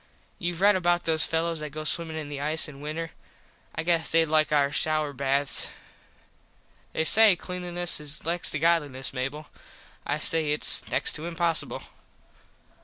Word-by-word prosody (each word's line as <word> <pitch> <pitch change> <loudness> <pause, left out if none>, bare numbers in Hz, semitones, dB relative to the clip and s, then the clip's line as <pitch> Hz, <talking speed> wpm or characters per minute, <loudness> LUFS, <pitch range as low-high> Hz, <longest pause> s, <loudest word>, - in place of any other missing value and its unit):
Youve 175 0 -3
red 205 0 +5
about 175 -1 +1
those 160 -1 +4
fellos 165 0 -1
that 150 0 -6
go 155 +2 -7
swimmin 160 +1 0
in 155 -2 -5
the 145 -1 -6
ice 155 +2 +3
in 140 -2 -12
winter. 160 +2 -5 0.6
I 165 - -2
guess 165 -1 +1
thed 165 -1 +2
like 155 0 +2
our 140 -2 +2
shouer 155 0 -1
baths. 140 +1 +1 1.2
They - - -1
say 215 +3 +6
Cleanliness 175 -1 -2
is 150 0 -8
next 170 +1 -2
to - - -3
Godliness, 145 -5 0
Mable. 135 +4 -4 0.6
I 145 - -2
say 155 -1 +2
its 150 - +2
next - - 0
to 155 +2 -6
impossible. 170 -1 -1
160 Hz, 160 wpm, -26 LUFS, 150-170 Hz, 1.2 s, say